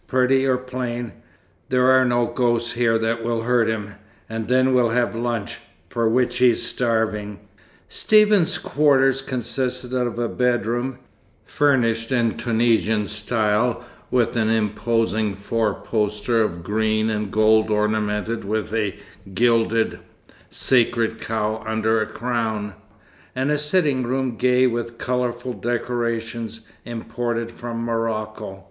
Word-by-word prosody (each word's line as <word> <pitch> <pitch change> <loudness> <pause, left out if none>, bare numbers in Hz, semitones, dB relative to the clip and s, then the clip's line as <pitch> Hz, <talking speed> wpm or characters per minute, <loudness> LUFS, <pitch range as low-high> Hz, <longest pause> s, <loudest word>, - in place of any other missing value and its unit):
Pretty 130 +1 +2
or 130 -1 +3
plain, 125 -2 -4 0.6
there 125 0 +3
are 130 0 +5
no 120 -1 +2
ghosts 120 -1 0
here 115 -1 +2
that 115 +1 -1
will 115 -1 -1
hurt 120 -1 +2
him. 105 -2 -3 0.3
And 110 -1 -4
then 130 +1 +3
we'll 125 -2 +3
have 120 +1 +1
lunch, 115 -3 -3 0.3
for 115 -2 0
which 125 +2 +1
he's 125 -2 +4
starving." 110 -4 -1 0.5
Stephen's 210 -5 +3
quarters 135 -2 +2
consisted 125 0 -3
of 125 -2 -1
a 120 0 0
bedroom 120 +1 -1 0.5
(furnished 115 -5 +1
in 120 -3 +1
Tunisian 110 -2 +1
style, 110 +3 0 0.2
with 125 -2 +1
an 110 -2 +1
imposing 110 -1 0
four 105 +1 -1
poster 105 +1 -1
of 85 -6 -2
green 110 +2 0
and 105 -1 -2
gold 110 0 +3
ornamented 105 +1 0
with 110 +1 -3
a 105 -4 -1 0.4
gilded, 115 0 +2 0.5
sacred 115 -3 +1
cow 110 0 -2
under 110 0 +1
a 110 - -1
crown) 110 -4 -3 0.6
and 130 +3 0
a 150 - +2
sitting 150 -3 +2
room 130 0 -1
gay 125 +2 +3
with 120 -1 -2
colourful 125 0 -2
decorations 115 -2 -3 0.2
imported 115 0 -3
from 115 0 -5
Morocco. 110 -3 -3
115 Hz, 125 wpm, -22 LUFS, 110-125 Hz, 0.6 s, are